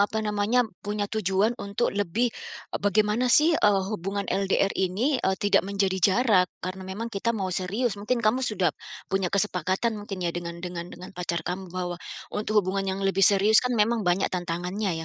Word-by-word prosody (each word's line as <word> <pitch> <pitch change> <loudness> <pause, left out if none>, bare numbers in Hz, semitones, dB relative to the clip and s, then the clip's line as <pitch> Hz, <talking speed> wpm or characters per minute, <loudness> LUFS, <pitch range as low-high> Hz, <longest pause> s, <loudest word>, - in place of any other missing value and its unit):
apa 215 +2 +1
namanya 210 +4 +2 0.2
punya 205 0 -2
tujuan 205 +1 +1
untuk 200 +4 -1
lebih 205 +4 0 0.4
ep - - -3
bagaimana 210 +4 +2
sih, 305 +6 +5
eee, 205 -10 +3
hubungan 200 +1 -3
LDR 195 0 +1
ini, 215 +10 0
eee, 190 - +1
tidak 205 +1 +3
menjadi 195 -1 0
jarak. 195 -1 +4 0.2
Karena 185 +1 -6
memang 225 +4 -5
kita 225 +4 -1
mau 190 -3 -2
serius. 200 +4 -1
Mungkin 235 +3 -1
kamu 220 +5 +3
sudah, 210 -8 0 0.4
punya 195 -1 +1
kesepakatan 195 +2 0
mungkin 205 -3 -5
ya 170 - 0
dengan 170 -1 -5
dengan 175 -1 -5
dengan 180 +2 -10
pacar 175 -2 -3
kamu 185 +2 -4
bahwa 175 -1 -4 0.3
untuk 210 -1 +1
hubungan 190 0 -1
yang - - -5
lebih 195 0 +1
serius 200 +3 +5
kan 250 -1 -1
memang 225 +2 +2
banyak 180 +2 +1
tantangannya 175 0 -2
195 Hz, 175 wpm, -26 LUFS, 185-215 Hz, 0.4 s, sih